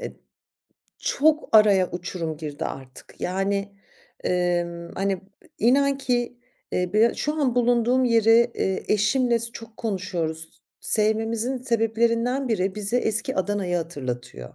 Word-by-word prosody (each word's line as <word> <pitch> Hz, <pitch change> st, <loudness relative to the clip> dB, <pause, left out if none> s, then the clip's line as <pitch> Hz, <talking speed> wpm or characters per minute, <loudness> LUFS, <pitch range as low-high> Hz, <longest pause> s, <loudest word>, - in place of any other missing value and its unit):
eee, -, -, -7 dB, 0.8 s
çok 305 Hz, +2 st, +1 dB
araya 205 Hz, -4 st, +5 dB
uçurum 170 Hz, -2 st, -4 dB
girdi 150 Hz, -2 st, -6 dB
artık. 130 Hz, -1 st, -9 dB
Yani, 195 Hz, +2 st, -1 dB, 0.5 s
emm, 175 Hz, -1 st, -1 dB
hani, 195 Hz, -1 st, -1 dB, 0.4 s
inan 275 Hz, +4 st, +3 dB
ki, 245 Hz, -2 st, -1 dB, 0.3 s
eee, 180 Hz, -1 st, -1 dB
b 225 Hz, +2 st, +4 dB
şu 300 Hz, -, -2 dB
an 260 Hz, -5 st, +1 dB
bulunduğum 245 Hz, +1 st, +2 dB
yeri, 230 Hz, 0 st, +4 dB
eee, 190 Hz, 0 st, -1 dB
eşimle 235 Hz, +3 st, +2 dB
s 230 Hz, 0 st, +2 dB
çok 225 Hz, -1 st, -11 dB
konuşuyoruz. 170 Hz, -6 st, -4 dB, 0.2 s
Sevmemizin 225 Hz, +3 st, +1 dB
sebeplerinden 235 Hz, +2 st, 0 dB
biri, 195 Hz, -4 st, 0 dB
bize 210 Hz, +3 st, -1 dB
eski 220 Hz, -2 st, 0 dB
Adana'yı 190 Hz, -2 st, -1 dB
hatırlatıyor. 125 Hz, -, -6 dB
215 Hz, 120 wpm, -24 LUFS, 180-235 Hz, 0.8 s, araya